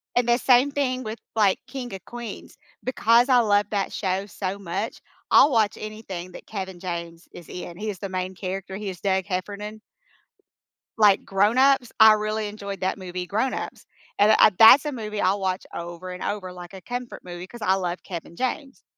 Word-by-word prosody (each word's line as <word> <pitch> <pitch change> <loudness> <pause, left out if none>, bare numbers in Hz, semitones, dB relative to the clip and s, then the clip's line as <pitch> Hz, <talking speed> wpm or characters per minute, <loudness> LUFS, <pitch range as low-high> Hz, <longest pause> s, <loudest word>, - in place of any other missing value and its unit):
and 245 - +3
the 240 - +5
same 255 +2 +4
thing 255 -3 -1
with, 220 +1 -5 0.2
like, 205 -4 +3
King 255 -3 -6
of 190 - -11
Queens. 235 -3 -8 0.3
Because 240 0 +3
I 250 -1 +6
love 205 -3 +3
that 200 -2 -1
show 190 0 -2
so 195 -1 -4
much 195 +4 -4 0.3
I'll - - +7
watch 220 -3 +2
anything 195 -5 -7
that - - -11
Kevin 190 -4 -6
James 170 -2 -6
is 175 - -12
in. 175 -1 -7
He 215 +1 -4
is 200 - -4
the 200 - -4
main 185 0 -3
character. 190 +1 -5
He 205 -2 -4
is 180 -2 -8
Doug 190 -1 +1
Heffernan. 205 +3 -5 1.2
Like, 205 -3 +5
Grown 205 +5 +2
Ups, 265 -2 +4
I 220 0 +9
really 215 0 -1
enjoyed 200 -2 -7
that 190 +1 -1
movie, 180 -1 -5
Grown 225 +7 0
Ups. - - -6 0.3
And 205 +1 +5
I - - +8
that's 240 +6 +9
a 295 - -2
movie 215 -4 -4
I'll 195 +2 +2
watch 185 -1 -2
over 170 +2 -7
and 180 - -8
over 185 -3 -3
like 175 0 -10
a 190 - -9
comfort 245 -1 -6
movie 175 0 -8
'cause 240 0 -11
I 190 - +3
love 180 -2 -3
Kevin 170 -2 -7
James. 265 +1 -3
200 Hz, 195 wpm, -24 LUFS, 185-225 Hz, 1.2 s, I